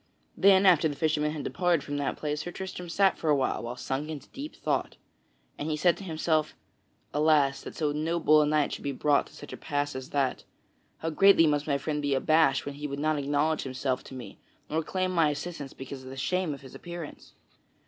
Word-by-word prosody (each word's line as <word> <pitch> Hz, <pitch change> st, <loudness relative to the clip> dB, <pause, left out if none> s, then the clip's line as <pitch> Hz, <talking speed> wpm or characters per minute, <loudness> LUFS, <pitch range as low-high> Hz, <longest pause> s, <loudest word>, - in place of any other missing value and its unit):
Then, 195 Hz, 0 st, +5 dB
after 170 Hz, -4 st, +6 dB
the 145 Hz, -, -4 dB
fisherman 150 Hz, -1 st, +1 dB
had 150 Hz, -2 st, -5 dB
departed 175 Hz, -4 st, +1 dB
from 145 Hz, -1 st, -4 dB
that 140 Hz, -1 st, -2 dB
place, 150 Hz, 0 st, -2 dB
Sir 175 Hz, -, -5 dB
Tristram 180 Hz, -1 st, -6 dB
sat 195 Hz, +2 st, +2 dB
for 160 Hz, -, -1 dB
a 150 Hz, -, +5 dB
while 125 Hz, -3 st, -1 dB
sunk 135 Hz, +4 st, -3 dB
into 150 Hz, -3 st, -7 dB
deep 290 Hz, +3 st, -8 dB
thought. -, -, -2 dB, 0.6 s
And 150 Hz, -, -3 dB
he 155 Hz, -, -1 dB
said 175 Hz, +3 st, +4 dB
to -, -, -9 dB
himself: 160 Hz, -3 st, 0 dB, 0.6 s
"Alas, 150 Hz, -2 st, +3 dB
that -, -, -9 dB
so 150 Hz, -2 st, 0 dB
noble 155 Hz, 0 st, +3 dB
a 150 Hz, -, +2 dB
knight 150 Hz, -1 st, +1 dB
should -, -, -6 dB
be 140 Hz, -, -2 dB
brought 145 Hz, +2 st, +2 dB
to -, -, -17 dB
such 145 Hz, -, -10 dB
a -, -, -6 dB
pass 145 Hz, -2 st, -2 dB
as 130 Hz, 0 st, -6 dB
that! 140 Hz, -2 st, 0 dB, 0.5 s
How 165 Hz, -, -3 dB
greatly 195 Hz, +1 st, +6 dB
must 150 Hz, -1 st, +1 dB
my 140 Hz, -2 st, +2 dB
friend 150 Hz, +1 st, -2 dB
be 140 Hz, -1 st, +1 dB
abased 140 Hz, 0 st, +3 dB
when 145 Hz, -, -4 dB
he 145 Hz, +1 st, -5 dB
would 140 Hz, 0 st, -5 dB
not 155 Hz, +1 st, +1 dB
acknowledge 145 Hz, +3 st, +1 dB
himself 130 Hz, -1 st, -2 dB
to 130 Hz, -, -10 dB
me 115 Hz, -6 st, -9 dB, 0.3 s
nor 160 Hz, +1 st, +1 dB
claim 185 Hz, +3 st, -1 dB
my 165 Hz, -4 st, +3 dB
assistance 150 Hz, -1 st, -5 dB
because 135 Hz, 0 st, -8 dB
of 130 Hz, -, -9 dB
the 135 Hz, -, -8 dB
shame 180 Hz, +4 st, 0 dB
of -, -, -14 dB
his 130 Hz, -2 st, -12 dB
appearance! 170 Hz, -3 st, -9 dB
150 Hz, 220 wpm, -28 LUFS, 140-165 Hz, 0.6 s, after